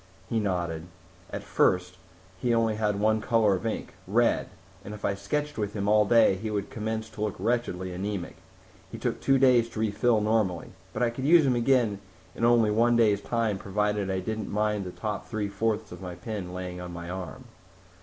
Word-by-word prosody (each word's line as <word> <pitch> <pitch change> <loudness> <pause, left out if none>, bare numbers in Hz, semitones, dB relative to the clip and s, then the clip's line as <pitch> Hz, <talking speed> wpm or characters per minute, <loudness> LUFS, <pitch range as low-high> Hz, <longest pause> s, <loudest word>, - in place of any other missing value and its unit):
He 115 - 0
nodded. 85 -5 -2 0.4
"At - - -5
first 90 0 +1 0.4
he 120 +3 +1
only 115 -1 +2
had 105 -2 0
one 110 +1 +2
color 110 -3 +3
of 95 +4 -2
ink 110 - -4
red - - +2 0.3
and 105 - -7
if 105 - -6
I 100 - +1
sketched 130 +9 -3
with 105 -1 -2
him 100 -1 -2
all 105 0 +5
day 115 -3 +5
he 110 +3 -4
would 100 -2 -3
commence 110 -1 -3
to 110 - -9
look 105 -2 -1
wretchedly 95 -4 -1
anemic. 95 0 -4 0.5
He - - -6
took - - -2
two 135 0 +4
days 125 -3 +4
to 110 - -7
refill, 110 +2 +2
normally. 105 -5 0 0.2
But 115 - -1
I 120 - +2
could 130 +3 -5
use 160 0 +6
him 130 -2 +3
again 120 -4 +2 0.3
in - - -6
only 115 -2 +4
one 120 +2 +3
day's 105 -4 +3
time 110 -2 -1
provided 105 0 -1
I 95 -1 -1
didn't 110 +1 -4
mind 105 -1 0
the 90 - -5
top 105 +2 -4
three 110 -3 -2
fourths 110 +1 -1
of 90 0 -9
my 90 -2 -6
pen 90 0 -5
laying 90 0 -6
on 90 0 -7
my 85 0 -7
arm." 90 -3 -6
105 Hz, 200 wpm, -27 LUFS, 95-115 Hz, 0.5 s, use